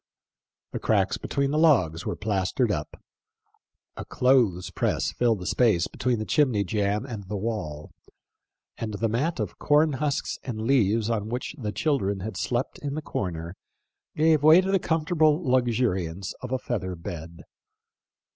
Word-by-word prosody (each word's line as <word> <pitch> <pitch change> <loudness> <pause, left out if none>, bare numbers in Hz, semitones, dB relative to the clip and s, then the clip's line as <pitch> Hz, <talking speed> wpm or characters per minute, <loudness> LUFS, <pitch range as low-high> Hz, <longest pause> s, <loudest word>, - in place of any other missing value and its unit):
The - - -4
cracks - - +1
between 140 0 -1
the 150 - +1
logs 115 - +3
were - - -2
plastered 105 +3 0
up. 75 -4 -4 1.0
A - - -6
clothes 120 -9 +2
press - - 0
filled 120 -3 +1
the 90 - -8
space 105 -5 +2
between 125 -1 -1
the 110 - -3
chimney 125 -9 +2
jamb 100 +4 -1
and 110 -7 -7
the 105 - -2
wall, 95 -9 -4 0.9
and 110 -2 -4
the 115 +3 0
mat 135 +8 -1
of 105 -5 -4
corn 150 +1 +3
husks 145 +1 -2
and 115 -4 -5
leaves 115 -4 +2
on 110 -1 -2
which 125 +5 -4
the 110 -8 -4
children 100 -3 0
had 110 0 -5
slept 120 +8 -2
in 140 -1 -4
the 155 - -4
corner 85 - -4 0.6
gave 155 -1 +3
way 155 +3 +8
to 190 +1 0
the 195 - +3
comfortable 155 -2 +2
luxuriance 110 - 0
of 125 - -6
a 130 - +1
feather 100 -8 -3
bed. 85 0 -8
115 Hz, 155 wpm, -26 LUFS, 95-140 Hz, 1.0 s, way